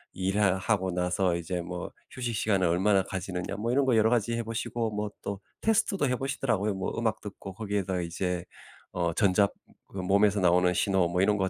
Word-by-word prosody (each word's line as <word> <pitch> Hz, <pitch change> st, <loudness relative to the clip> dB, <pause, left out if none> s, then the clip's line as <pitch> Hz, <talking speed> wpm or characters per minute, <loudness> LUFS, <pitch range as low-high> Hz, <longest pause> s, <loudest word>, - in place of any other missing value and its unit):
"일하 95 Hz, 0 st, +2 dB
하고 95 Hz, -1 st, 0 dB
나서 90 Hz, 0 st, +1 dB
이제 85 Hz, +1 st, -3 dB
뭐 90 Hz, +1 st, -6 dB, 0.2 s
휴식시간을 110 Hz, -6 st, 0 dB
얼마나 95 Hz, +4 st, +3 dB
가지느냐?" 95 Hz, 0 st, -4 dB
뭐 110 Hz, +3 st, -2 dB
이런 135 Hz, +2 st, +3 dB
거 130 Hz, -3 st, +3 dB
여러 110 Hz, 0 st, +4 dB
가지 115 Hz, -1 st, +1 dB
해 115 Hz, -, -1 dB
보시고 115 Hz, 0 st, -2 dB
뭐 105 Hz, 0 st, -2 dB
또 100 Hz, -1 st, -4 dB, 0.2 s
테스트도 200 Hz, -7 st, +2 dB
해 125 Hz, -, +1 dB
보시더라고요. 120 Hz, -6 st, -1 dB
뭐 95 Hz, -, -3 dB
음악 110 Hz, -2 st, 0 dB
듣고 100 Hz, -1 st, -8 dB
거기에다가 100 Hz, -3 st, -2 dB
이제 90 Hz, +1 st, -2 dB, 0.5 s
어 85 Hz, -2 st, -1 dB
전자 100 Hz, +1 st, +4 dB, 0.4 s
그 -, -, -11 dB
몸에서 100 Hz, +2 st, +3 dB
나오는 90 Hz, 0 st, +4 dB
신호 95 Hz, -3 st, +2 dB
뭐 90 Hz, +2 st, 0 dB
이런 105 Hz, +2 st, +3 dB
거 95 Hz, -1 st, 0 dB
100 Hz, 385 characters per minute, -28 LUFS, 90-110 Hz, 0.5 s, 여러